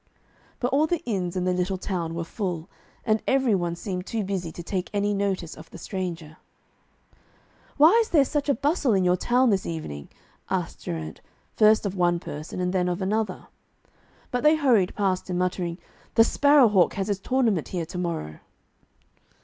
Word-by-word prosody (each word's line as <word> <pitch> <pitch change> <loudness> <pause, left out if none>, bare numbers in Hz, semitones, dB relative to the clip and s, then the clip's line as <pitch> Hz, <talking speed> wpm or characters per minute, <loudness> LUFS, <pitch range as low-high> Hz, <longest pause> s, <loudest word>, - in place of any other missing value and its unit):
But 245 - 0
all 300 +3 +3
the 345 0 -1
inns 190 -7 -2
in 180 - 0
the 180 0 +1
little 180 +1 -1
town 175 -3 -3
were 170 - -2
full, 175 -2 -4 0.4
and 215 -1 +2
every 265 -4 +3
one 175 -3 0
seemed 180 0 -5
too 225 -3 -2
busy 185 -4 -3
to 170 - -8
take 185 +1 -3
any 205 0 +1
notice 195 -4 -2
of 155 +1 -13
the - - -11
stranger. 170 -5 -5 1.4
'Why 305 +3 +7
is 450 - -3
there 290 -5 +4
such 290 +1 -2
a 280 - +3
bustle 285 - +1
in 190 - +2
your 180 0 +3
town 245 +6 +2
this 195 -2 0
evening?' 75 - -6 0.4
asked - - -3
Geraint, 80 -2 -5 0.3
first 215 0 +5
of 195 - -1
one 175 -2 +2
person 155 +2 -7
and 180 0 -1
then 180 -1 +1
of 175 - -2
another. 205 0 -2 0.9
But 245 - -1
they 305 +1 +5
hurried 245 -11 +2
past 190 -3 -1
him, 180 - -1
muttering, 180 -1 -1 0.4
'The 225 - +7
Sparrow 285 +2 +5
hawk 190 -4 +3
has 195 0 -2
his 200 -2 -1
tournament 225 - +1
here 175 -3 -3
to 180 +3 -8
morrow.' 165 - -4
190 Hz, 180 wpm, -25 LUFS, 175-225 Hz, 1.4 s, Why